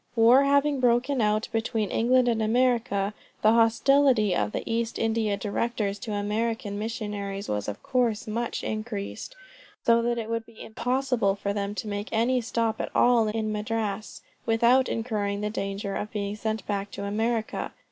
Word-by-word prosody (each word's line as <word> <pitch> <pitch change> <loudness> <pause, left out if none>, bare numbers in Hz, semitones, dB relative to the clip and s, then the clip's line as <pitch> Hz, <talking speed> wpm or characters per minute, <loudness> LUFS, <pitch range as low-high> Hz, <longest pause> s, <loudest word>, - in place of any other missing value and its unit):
War 240 +4 +6
having 280 0 +3
broken 250 +2 +2
out 215 +1 +1
between 225 -3 -1
England 250 +2 +3
and 230 -2 +1
America, 220 -3 +1 0.3
the 215 - +6
hostility 230 -2 +4
of 105 -7 0
the - - -3
East 230 0 -1
India 220 -2 0
Directors 205 0 -2
to 220 -1 -5
American 210 +1 -2
missionaries 210 -3 -4
was 105 -1 -2
of 105 - -6
course 235 -4 0
much 230 +2 -3
increased, 215 - -5 0.5
so 230 0 +5
that 235 0 0
it 225 -2 -3
would 230 0 -3
be 230 -1 -17
impossible 245 -2 0
for 200 0 -2
them 200 0 -3
to 215 - -4
make 205 0 -4
any 240 +3 +2
stop 230 -1 -1
at - - -3
all 240 -3 +4
in 215 0 -1
Madras, 215 -1 -3 0.2
without 240 +3 +3
incurring 210 -3 -2
the 210 0 -2
danger 200 -1 -3
of 210 - -3
being 205 -1 -3
sent 220 +1 -3
back 200 -1 -2
to 200 - -7
America. 220 +2 -1
225 Hz, 165 wpm, -26 LUFS, 205-235 Hz, 0.5 s, War